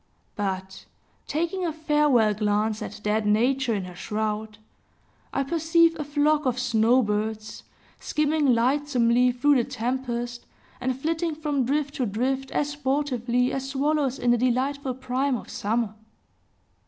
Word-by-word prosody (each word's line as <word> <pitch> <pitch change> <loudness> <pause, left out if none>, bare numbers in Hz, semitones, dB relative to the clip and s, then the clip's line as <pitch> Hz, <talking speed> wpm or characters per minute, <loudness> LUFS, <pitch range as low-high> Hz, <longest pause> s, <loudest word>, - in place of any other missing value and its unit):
But, 190 -2 -4 0.4
taking 340 +5 -1
a 340 - 0
farewell 295 -8 +2
glance 210 +1 0
at - - -7
dead 210 0 0
Nature 240 +3 +2
in 195 -2 -3
her 180 - -9
shroud, 215 +3 -3 0.7
I 275 - 0
perceive 330 +3 +3
a - - -1
flock 295 0 +1
of 250 -1 0
snow 245 0 +3
birds, 215 +1 -3 0.4
skimming 305 -1 +1
lightsomely 250 -1 +2
through 275 +3 +3
the 240 - +2
tempest, 240 -1 -3 0.3
and 255 0 -2
flitting 325 +2 -1
from 295 -4 -1
drift 285 +2 -1
to 255 - 0
drift, 260 +6 -1
as 290 - -1
sportively 260 -4 0
as 270 0 -3
swallows 275 -1 0
in 245 - +2
the 240 - +3
delightful 260 +2 0
prime 260 +1 -1
of - - -10
summer. 220 +1 -1
255 Hz, 140 wpm, -25 LUFS, 225-290 Hz, 0.7 s, perceive